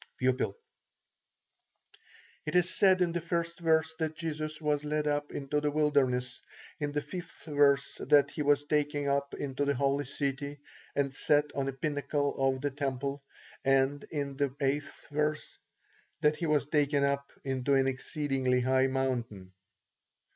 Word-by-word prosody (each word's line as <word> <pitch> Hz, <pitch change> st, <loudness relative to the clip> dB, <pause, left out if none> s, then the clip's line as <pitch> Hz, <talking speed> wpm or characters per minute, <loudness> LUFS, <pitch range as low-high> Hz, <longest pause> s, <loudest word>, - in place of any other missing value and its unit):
P. 130 Hz, -, -1 dB, 2.2 s
It -, -, -2 dB
is 180 Hz, 0 st, +3 dB
said 185 Hz, -2 st, +5 dB
in 175 Hz, -, 0 dB
the 170 Hz, 0 st, -2 dB
1st 170 Hz, 0 st, -2 dB
verse 160 Hz, -1 st, +2 dB
that 160 Hz, -1 st, -1 dB
Jesus 155 Hz, -1 st, -4 dB
was 150 Hz, -2 st, 0 dB
led 150 Hz, 0 st, -1 dB
up 145 Hz, 0 st, -1 dB
into 145 Hz, +1 st, -2 dB
the 150 Hz, -, +1 dB
wilderness; 135 Hz, -5 st, +1 dB, 0.4 s
in 145 Hz, -1 st, -2 dB
the 145 Hz, 0 st, -1 dB
5th 175 Hz, +2 st, -8 dB
verse, 140 Hz, -2 st, +3 dB
that 145 Hz, -1 st, +4 dB
he 150 Hz, -, -4 dB
was 145 Hz, 0 st, +3 dB
taken 145 Hz, -1 st, 0 dB
up 140 Hz, 0 st, 0 dB
into 140 Hz, 0 st, -2 dB
the 140 Hz, 0 st, +1 dB
holy 140 Hz, +2 st, +1 dB
city, 140 Hz, +1 st, -3 dB, 0.4 s
and 140 Hz, -1 st, 0 dB
set 145 Hz, +1 st, +2 dB
on 135 Hz, -1 st, -1 dB
a -, -, 0 dB
pinnacle 145 Hz, +1 st, -1 dB
of 135 Hz, -1 st, +1 dB
the 145 Hz, 0 st, -1 dB
temple; 140 Hz, 0 st, -3 dB, 0.4 s
and 135 Hz, +1 st, +2 dB
in 140 Hz, -3 st, -3 dB
the 140 Hz, 0 st, +1 dB
8th 140 Hz, +2 st, -3 dB
verse, 150 Hz, +1 st, -1 dB, 0.6 s
that 150 Hz, 0 st, +3 dB
he 170 Hz, -, -2 dB
was 150 Hz, -2 st, +2 dB
taken 145 Hz, -1 st, +2 dB
up 140 Hz, 0 st, 0 dB
into 135 Hz, +1 st, +1 dB
an 135 Hz, 0 st, +4 dB
exceedingly 135 Hz, -1 st, 0 dB
high 130 Hz, +1 st, +3 dB
mountain. 120 Hz, -8 st, -2 dB
145 Hz, 155 wpm, -30 LUFS, 135-150 Hz, 2.2 s, said